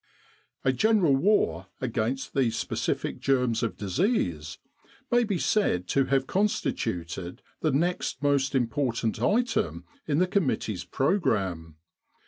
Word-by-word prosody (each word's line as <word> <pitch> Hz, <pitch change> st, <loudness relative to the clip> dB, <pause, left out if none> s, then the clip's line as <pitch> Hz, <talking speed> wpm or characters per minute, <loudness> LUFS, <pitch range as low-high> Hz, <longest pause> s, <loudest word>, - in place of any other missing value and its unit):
A 130 Hz, -, +4 dB
general 195 Hz, -, +3 dB
war 135 Hz, -, +2 dB
against 130 Hz, +2 st, -2 dB
the 135 Hz, -4 st, +2 dB
specific -, -, -2 dB
germs 125 Hz, -4 st, +1 dB
of 115 Hz, -, -2 dB
disease 95 Hz, -, -1 dB, 0.5 s
may 240 Hz, 0 st, +4 dB
be 205 Hz, -5 st, -1 dB
said 170 Hz, -, +1 dB
to 135 Hz, -1 st, +2 dB
have 135 Hz, -1 st, +1 dB
constituted 95 Hz, -, -2 dB, 0.2 s
the 155 Hz, -, +1 dB
next 155 Hz, -2 st, -1 dB
most 140 Hz, -1 st, +2 dB
im 125 Hz, -2 st, +3 dB
portant 115 Hz, -3 st, -1 dB
item 245 Hz, +4 st, 0 dB, 0.2 s
in 145 Hz, -2 st, +1 dB
the 180 Hz, -, +4 dB
committee's 135 Hz, -, -1 dB
programme. 95 Hz, -, 0 dB
135 Hz, 120 wpm, -27 LUFS, 110-180 Hz, 0.5 s, A